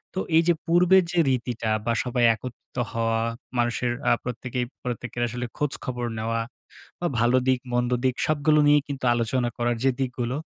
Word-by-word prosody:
তো 190 - 0 0.2
এইযে 170 +1 +4
পূর্বের 180 +2 +5
যে 175 - +1
রীতিটা 120 -3 -1 0.2
বা, 115 - +1
সবাই 125 -1 0
একত্রিত 125 +2 -10
হওয়া, 115 0 0 0.4
মানুষের 120 0 +1 0.2
আ - - +5
প্রত্যেকেই 125 +1 -3 0.2
প্রত্যেকের 125 0 -4
আসলে 125 +1 -4
খোঁজখবর 130 -4 -2
নেওয়া 115 +1 -1 0.6
বা 175 - 0
ভালো 120 +2 +4
দিক, 130 -1 +3
মন্দ 120 0 +1
দিক 130 -1 +2
সবগুলো 155 0 +3
নিয়েই 145 -1 +5
কিন্তু 140 -2 -6
তো - - +3
আলোচনা 120 +1 0
করার 120 0 0
যে 135 - +4
দিকগুলো, 125 -1 -2
125 Hz, 165 wpm, -25 LUFS, 120-140 Hz, 0.6 s, পূর্বের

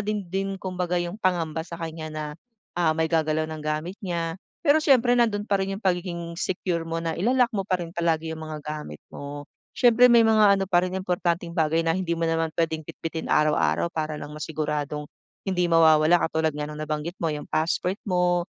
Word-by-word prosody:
din 210 -1 -1
din 195 0 -1
kumbaga 180 -2 -2
yung 175 +4 -5
pangamba 165 -4 0
sa 170 - -8
kanya 160 -1 -6
na 155 0 -5 0.5
ah, 165 -2 +1
may 160 - +2
gagalaw 160 -1 +1
ng 155 -1 -6
gamit 155 +5 -3
niya. 170 -2 -3 0.2
Pero 300 -1 +5
siyempre 245 -3 +5
nandun 215 -3 +1
pa 200 - +3
rin 195 0 -2
yung - - -15
pagiging 175 -2 -2
secure 175 -2 -2
mo 165 0 -3
na 165 -1 -2
ila-lock 245 +6 +3
mo 195 - -1
pa 185 -2 0
rin 170 - -5
palagi 165 -1 0
yung 160 - -7
mga 155 -1 -6
gamit 150 - -7
mo. 145 +1 -8 0.2
Siyempre 245 0 +6
may 235 - +7
mga 210 -3 +5
ano 195 - 0
pa 175 -1 +4
rin 185 - -4
importanteng 175 -2 -1
bagay 160 0 +2
na 165 - +3
hindi 180 -3 -1
mo 165 0 0
naman 165 0 0
pwedeng 160 -1 0
bitbitin 165 0 -5
araw-araw 155 +2 +2
para 155 -2 -3
lang - - -7
masiguradong 150 -1 -3 0.4
hindi 180 -1 +1
mawawala 160 +1 +5
katulad 160 -1 0
nga 150 0 -4
ng 150 - -8
nabanggit 155 +3 -4
mo 165 - 0
yung 150 - -6
passport 175 +4 0
mo, 180 -2 +1
170 Hz, 195 wpm, -25 LUFS, 155-185 Hz, 0.5 s, may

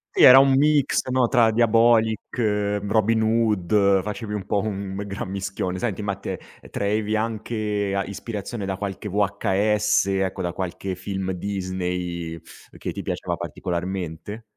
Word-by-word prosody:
Sì, - - +5
era 130 +1 +11
un 135 0 +5
mix, 145 -2 +2
no, 125 -1 +3
tra 115 -3 +4
Diabolik, 115 0 +3 0.4
Robin 110 +2 +2
Hood, 105 -3 +2
facevi 105 +2 -5
un 105 -2 -3
po' 105 - +1
un 100 -2 -4
gran 100 -1 -5
mischione. 95 -1 -3
Senti, 105 0 -2
ma 100 -1 -2
te, 95 -2 -5 0.3
traevi 105 +1 0
anche 110 -2 -2
a 100 - +1
ispirazione 105 +1 -5
da 95 0 -2
qualche 100 +1 -5
VHS, 105 +1 +1
ecco, 95 -1 -1
da 90 -1 -1
qualche 95 +1 -4
film 95 +1 -4
Disney 90 -3 -3 0.4
che - - -4
ti - - -6
piaceva - - -3
particolarmente? 90 +3 -4
100 Hz, 140 wpm, -23 LUFS, 95-110 Hz, 0.4 s, era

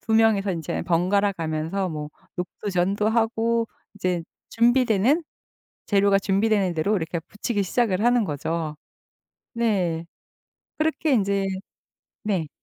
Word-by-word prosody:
2 220 - -1
명이서 210 -3 +4
인제 165 -3 -3
번갈아 195 +4 +2
가면서 165 +3 -2
뭐 150 -1 -5 0.3
녹두전도 195 +3 -1
하고 230 0 +1 0.3
이제 180 -3 -1 0.3
준비되는 240 - +3 0.6
재료가 200 -1 +4
준비되는 195 -2 +1
대로 160 +7 +1
이렇게 165 0 -2
부치기 205 +4 -2
시작을 210 0 +1
하는 240 -2 +4
거죠. 155 +1 -3 0.8
네. 185 -8 0 0.7
그렇게 310 -1 +1
인제 200 -3 +2 0.8
네. 180 -8 0
200 Hz, 250 characters per minute, -24 LUFS, 175-225 Hz, 0.8 s, 명이서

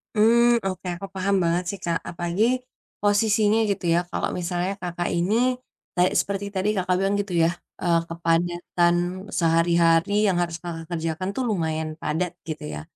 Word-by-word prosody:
Mmm, 235 +2 +4
oke, 185 -1 -3
aku 195 +3 -7
paham 195 +1 +1
banget 170 +1 +1
sih 200 -1 -4
Kak. 170 -1 0
Apalagi, 175 +3 -1 0.6
posisinya 210 +1 +3
gitu 195 -2 -2
ya, 170 - +4
kalau - - -1
misalnya 180 +2 -1
Kakak, 175 -1 -3
ini, 180 +5 +1 0.6
kayak 180 0 +3
seperti 200 0 -2
tadi 190 +2 +1
Kakak, 180 -1 +1
bilang 195 +1 +1
gitu 200 -2 -3
ya - - +3 0.3
eee, 170 -2 +3
kepadatan 175 +1 +1 0.4
sehari-hari 165 +1 +3
yang 185 -3 +2
harus 170 -1 -2
Kakak, 165 -2 -6
kerjakan 165 +2 -2
tuh 260 - -1
lumayan 160 -5 -1
padat, 170 +3 -1
gitu 155 - -5
ya. 75 - -5
175 Hz, 155 wpm, -24 LUFS, 170-195 Hz, 0.6 s, Mmm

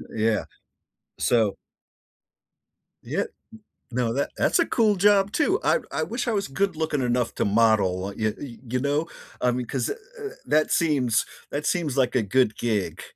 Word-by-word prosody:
Yeah. 110 -1 +1 0.7
So 110 -5 +2 1.5
Yeah - - -1 0.7
no 120 -2 0
that 140 +3 0
that's - - +2
a 335 - +4
cool 215 -3 +3
job 200 +1 +4
too. 375 +7 +2
I - - +3
I - - -1
wish 240 +2 -3
I 235 - +1
was 200 -1 0
good 195 +6 -1
looking 155 -3 -1
enough 120 -1 0
to - - 0
model, 100 -3 +2
y 110 -1 0
y 125 -5 -8
you 125 +2 -1
know? 145 +4 0 0.3
I 125 - +3
mean, 125 0 -2
'cause - - -2
eh 415 - 0 0.3
eh 415 - -3 0.2
that 155 +1 +2
seems 135 -9 +2 0.3
that 145 +1 -3
seems 155 -7 0
like 130 -2 +2
a 125 - +4
good 110 +1 +2
gig. 110 -5 -1
130 Hz, 170 wpm, -25 LUFS, 115-175 Hz, 1.5 s, a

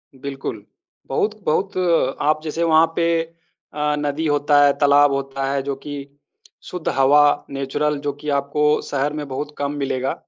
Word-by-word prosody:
बिल्कुल। 135 -5 -6 0.4
बहुत 210 +10 -1
बहुत 190 +5 0 0.4
आप 155 +1 +2
जैसे 160 +1 -2
वहाँ 160 -1 +5
पे 170 -1 +1 0.7
अ, 150 0 0
नदी 145 +2 -2
होता 145 0 +3
है, 140 - +5
तालाब 145 0 +5
होता 135 0 -3
है, 140 - 0
जो 140 0 -3
कि 145 +2 -9 0.7
शुद्ध 180 -3 -4
हवा 140 +2 +6 0.3
नेचुरल 145 +2 -1
जो 145 0 -1
कि 150 - -4
आपको 150 +2 +1
शहर 145 +1 -2
में 150 -1 -5
बहुत 145 +3 -5
कम 140 0 -2
मिलेगा 130 -1 -1
145 Hz, 160 wpm, -21 LUFS, 140-150 Hz, 0.7 s, हवा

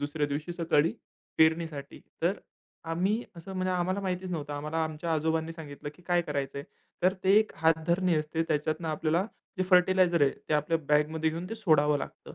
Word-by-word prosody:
दुसऱ्या 145 +1 -1
दिवशी 150 +4 -3
सकाळी 165 -2 +2 0.5
पेरणीसाठी. 160 -3 +1 0.2
तर 175 +3 +3 0.6
आम्ही 195 +7 +1
असं 170 +3 -9
म्हणजे 185 0 0
आम्हाला 180 +2 0
माहितीच 185 -1 -3
नव्हतं. 150 -3 -4
आम्हाला 150 +2 -4
आमच्या 160 +1 -3
आजोबांनी 160 +1 0
सांगितलं, 145 -3 -8
की 180 - -20
काय 175 -1 +3
करायचं 140 -3 -3
आहे? 140 - -6 0.4
तर 185 +1 +5
ते 195 +2 +5
एक 215 0 0
हात 160 -1 +2
धरणी 175 0 +2
असते. 155 +2 -1
त्याच्यातनं 155 +2 -1
आपल्याला 160 +4 +1 0.3
जे - - +3
फर्टिलायझर 180 -2 +5
आहे, 140 - +5 0.2
ते 155 - +2
आपल्या 150 +2 +1
बॅगमध्ये 155 +2 +2
घेऊन 170 +3 -5
ते 225 - -2
सोडावं 150 -8 +3
लागतं. - - -8
160 Hz, 180 wpm, -29 LUFS, 150-180 Hz, 0.6 s, तर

